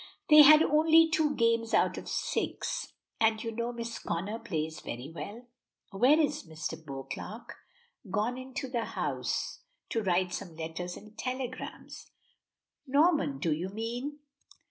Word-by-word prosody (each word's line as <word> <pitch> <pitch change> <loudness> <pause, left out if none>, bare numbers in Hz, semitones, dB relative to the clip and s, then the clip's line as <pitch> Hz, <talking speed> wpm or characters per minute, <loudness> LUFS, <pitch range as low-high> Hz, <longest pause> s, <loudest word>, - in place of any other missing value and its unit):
They 300 0 +11
had 305 +2 +9
only 320 +2 +5
two 315 -2 +1
games 230 -1 +2
out - - +3
of - - -7
the - - -7
six; - - -2 0.3
and 220 -1 +2
you 230 - -3
know 235 +2 -2
Miss 235 -1 -5
Connor 205 +6 -3
plays 160 -8 -3
very 125 +6 -7
well." 220 +8 -7 0.5
"Where 255 +10 +4
is 300 -1 +1
Mr. 160 - -5
Beauclerk?" 140 - -7 0.6
"Gone 215 +6 0
into 260 +1 -5
the 240 -3 -2
house - - -2 0.3
to 225 - 0
write 180 -2 +1
some 175 -5 -6
letters 165 +2 -5
and 215 +1 -14
telegrams." 255 0 -5 0.8
"Norman, 280 - +3
do 155 +3 0
you 170 +5 -3
mean?" 240 +8 -4
230 Hz, 145 wpm, -30 LUFS, 180-260 Hz, 0.8 s, They